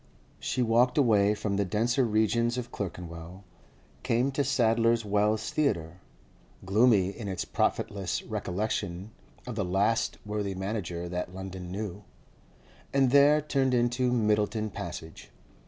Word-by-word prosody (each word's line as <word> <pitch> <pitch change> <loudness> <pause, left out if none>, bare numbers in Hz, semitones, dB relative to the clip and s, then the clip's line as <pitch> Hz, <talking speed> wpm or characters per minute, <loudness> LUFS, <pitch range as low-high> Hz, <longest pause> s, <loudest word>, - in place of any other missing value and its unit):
She 125 - -1
walked 120 +3 +3
away 105 -6 +4
from 105 -1 -2
the 100 - +2
denser 115 +7 +1
regions 115 +2 +1
of 125 -1 -5
Clerkenwell, 90 -1 -7 0.6
came 125 +2 +1
to 140 +1 0
Sadler's 115 -3 +2
Wells 105 +1 +1
Theatre 85 - -1 0.7
(gloomy 105 -1 +4
in 100 +1 -7
its 95 -3 -3
profitless 100 -3 -1
recollection 95 0 -3 0.3
of 125 - -5
the 105 -2 -1
last 95 +5 +1
worthy 105 -2 -3
manager 95 -3 -4
that 90 +1 -4
London 95 -2 -7
knew), 100 0 -5 0.9
and 135 -2 +3
there 145 +2 +6
turned 135 -3 +1
into 125 +1 +1
Myddelton 105 -2 +1
Passage. 80 -2 -7
105 Hz, 125 wpm, -28 LUFS, 95-120 Hz, 0.9 s, there